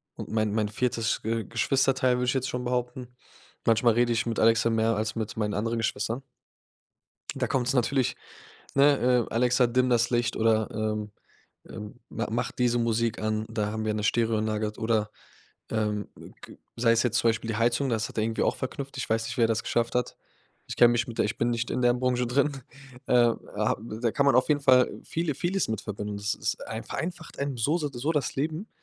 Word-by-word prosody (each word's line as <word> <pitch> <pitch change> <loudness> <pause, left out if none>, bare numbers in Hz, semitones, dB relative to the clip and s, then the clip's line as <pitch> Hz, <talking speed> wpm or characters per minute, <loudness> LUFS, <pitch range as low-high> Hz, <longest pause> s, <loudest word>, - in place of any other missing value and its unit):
und - - -7
mein 110 -1 0
mein 110 -1 +1
viertes 115 +1 -1
Ge 115 0 -2
Geschwisterteil, 130 +2 +2
würde 125 - 0
ich 125 - +1
jetzt 130 -1 -1
schon 125 0 -4
behaupten. 125 0 -3 0.5
Manchmal 115 0 +4
rede 120 +1 +2
ich 115 +1 +1
mit 115 -2 -2
Alexa 115 +1 +4
mehr 115 -1 +1
als 110 +1 -2
mit 110 0 -4
meinen 105 -2 -1
anderen 115 +3 -1
Geschwistern. 115 +2 -2 1.1
Da - - -1
kommt's 130 0 0
natürlich, 130 +1 +1 0.6
ne, 140 0 +5
ähm: 125 -2 +2
„Alexa 125 +2 +3
dimm 125 +2 +2
das 120 -1 +2
Licht.“ 120 -1 0
oder, 110 -1 +2
ähm, 105 -1 -2 0.6
ähm, 105 +3 -9
„Ma 115 - -3
mach 120 +2 -1
diese 120 -1 +1
Musik 115 -1 0
an.“ 110 0 -1
Da 105 -2 -2
haben 110 0 -3
wir 110 -1 0
'ne 105 - -2
Stereoanlage, 110 -1 +1
halt, 105 0 -7
oder, 110 -2 0 0.6
ähm, 105 -2 -1
g - - -13 0.2
g - - -11 0.2
sei 115 0 +3
es 115 - +3
jetzt 120 -1 +1
zum 115 - +3
Beispiel 115 0 -1
die 110 - -1
Heizung, 120 +4 +1
das 115 -2 -1
hat - - -8
er 110 - +2
irgendwie 115 0 -1
auch - - +1
verknüpft. 135 +1 -5
Ich 130 - -4
weiß 115 0 +1
nicht, - - -5
wie 120 - +3
er - - +6
das 110 -1 0
geschafft 115 0 -1
hat. 125 -1 -1 0.5
Ich - - -5
kenne 120 -1 +7
mich 120 0 +1
mit 115 - -8
der - - +3
ich 105 - -4
bin 120 - +1
nicht 120 0 -2
in 125 - -1
deren 120 0 +3
Branche 125 -1 +1
drin. 140 +4 +2 0.6
Ähm. 120 -2 +4 0.2
Ha - - +1 0.3
Da 120 - +2
kann 140 - +1
man 140 - +5
auf 130 - +3
jeden 145 -1 +2
Fall 130 -2 +5
viele 165 -3 -2
vieles 185 +3 -1
mit 110 -1 -2
verbinden. 105 -2 -5
Das 105 0 -1
ist - - -3
ein - - -5
vereinfacht 175 +1 -6
einem 140 -2 -2
so 145 +9 +1
se 150 -3 -2
d 125 - -9
so 150 +6 0
das 150 -3 -1
Leben, 160 +8 -2
115 Hz, 220 wpm, -27 LUFS, 110-125 Hz, 1.1 s, kenne